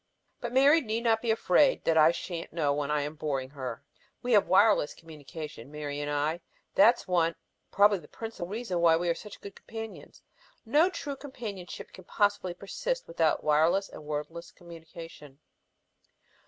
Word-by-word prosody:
But 240 - -4
Mary 280 +5 +5
need 225 -2 -3
not 225 -2 +2
be 235 - -3
afraid 225 +5 +3
that 165 - +3
I 155 0 +7
sha'n't 170 0 -6
know 150 -4 +1
when 145 0 -2
I 150 -1 +1
am 145 +1 -4
boring 135 -4 -3
her. 130 -5 -6 0.4
We 245 - -2
have 210 -3 +5
wireless 195 -6 +4
communication, 150 -4 -10
Mary 145 -1 -5
and 145 0 -3
I. 150 +3 -1 0.3
That's 230 +5 +4
one, 170 -2 +2 0.3
probably 205 0 +4
the 150 - -15
principal, 225 -4 -7
reason 205 -3 -3
why 165 -1 +5
we 175 +1 -1
are - - +3
such 205 +4 -11
good 200 - -9
companions. 225 -1 -9 0.4
No 300 +10 +4
true 295 -6 -5
companionship 225 -10 -8
can 185 - -13
possibly 205 -3 0
persist - - -4
without 165 -2 +1
wireless 160 +6 +3
and - - -11
wordless 150 +3 -5
communication. 165 -4 -12
170 Hz, 165 wpm, -29 LUFS, 150-220 Hz, 0.4 s, I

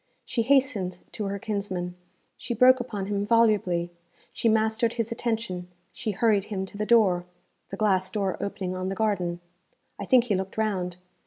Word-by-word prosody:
She 240 - -1
hastened 240 -8 +2
to 215 - -4
her 200 0 -2
kinsman, 195 -4 -3 0.4
she 240 - -4
broke 255 +3 +6
upon 210 -6 -4
him 200 0 -1
volubly, 205 -6 +2 0.4
she 230 - +1
mastered 220 +1 +2
his 230 -1 -2
attention, 225 -6 -2 0.3
she 235 - -4
hurried 205 -1 +2
him 195 -3 -3
to 190 - -12
the 210 - -1
door 195 -7 +4 0.4
the 195 - -6
glass 190 -3 +2
door 195 -2 -1
opening 190 -2 -3
on 185 0 -3
the 195 - -3
garden. 185 -5 -1 0.6
I 200 - -4
think 250 +3 +5
he 230 -4 -1
looked 190 +1 -3
round. 185 -5 -1
205 Hz, 170 wpm, -26 LUFS, 185-225 Hz, 0.6 s, broke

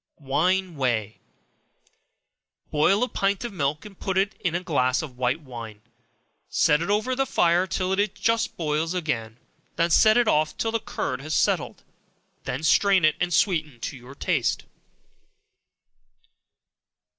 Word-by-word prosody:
Wine 170 +5 0
Whey. 115 -5 -1 1.5
Boil 190 +9 +3
a - - +1
pint 200 -2 -1
of 235 - -5
milk, 150 -2 -2
and 200 -3 -13
put 190 - -2
to 190 - +5
it 200 +2 -3 0.2
a - - +1
glass 130 -5 +1
of 135 -5 -9
white 130 +5 0
wine; 115 -6 -9 0.7
set 150 +1 +3
it 170 - -3
over 215 +5 +1
the 270 +1 0
fire 175 +2 +2
till 185 +1 -1
it 205 +1 0
just 225 +3 0
boils 160 +1 -1
again, 115 -10 -3 0.4
then 170 +1 +1
set 215 +6 +6
it 240 -2 +3
off 155 -4 +1
till 225 - -1
the 230 - 0
curd 130 -10 -4
has 155 +2 -3
settled, - - 0 0.6
when 135 +5 -4
strain 190 +1 +4
it, 155 - +3
and 180 0 0
sweeten 155 - +1
to 140 - -4
your 130 +2 -12
taste. 155 -5 0
165 Hz, 150 wpm, -25 LUFS, 140-195 Hz, 1.5 s, set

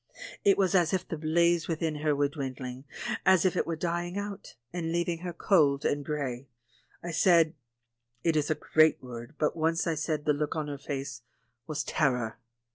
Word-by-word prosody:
It 195 - +5
was 195 -1 +2
as 175 -2 +3
if 185 -1 -1
the - - -3
blaze 170 +2 +2
within 160 -2 -1
her 150 0 +1
were 145 0 +2
dwindling, 130 -2 -6 0.4
as 190 -2 +5
if 185 - +2
it - - 0
were 165 - -1
dying 175 +2 -2
out, 205 -1 -6 0.2
and 165 -2 -2
leaving 170 0 0
her 175 +1 -4
cold 155 -6 +3
and 145 0 +1
grey. 140 -4 -3 0.6
I 175 - -4
said 165 -1 +4 0.3
— 120 0 -48
it 165 -2 +2
is 150 -1 +1
a 155 - +2
great 155 +1 +3
word, 120 +1 -8
but 150 - +1
once 165 +1 +1
I 165 - +1
said 150 -1 -2
the 150 - +4
look 150 +1 -2
on 155 -2 -2
her 140 -1 -5
face 135 -3 -5 0.5
was 155 -2 -2
"terror." 125 -7 0
155 Hz, 195 wpm, -29 LUFS, 140-170 Hz, 0.6 s, It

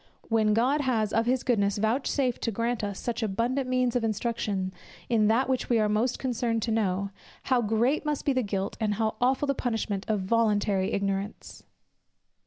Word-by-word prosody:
When 215 -2 +3
God 265 +6 +2
has 225 -6 0
of 225 +1 +2
his 255 0 +1
goodness 205 -5 +1
vouchsafed 250 +3 0
to 230 - -1
grant 230 +2 -1
us 200 -1 -3
such 240 0 -3
abundant 235 +5 -1
means 255 -1 +1
of 245 - +1
instruction 210 -4 -1 0.4
in 220 -3 +3
that 230 +5 +3
which 260 -1 -1
we 240 - +3
are 215 -1 +3
most 220 +4 +1
concerned 235 -3 -1
to 230 - -1
know, 200 -3 0 0.3
how 255 -2 +2
great 235 +6 +1
must 300 -2 -2
be 280 - +3
the 255 - +1
guilt, 195 -3 -2
and 210 -2 0
how 220 +1 0
aweful 260 +3 +2
the 275 - +1
punishment 225 -6 -2
of 210 -2 +1
voluntary 205 -2 +1
ignorance! 200 +1 -3
225 Hz, 185 wpm, -27 LUFS, 210-250 Hz, 0.4 s, When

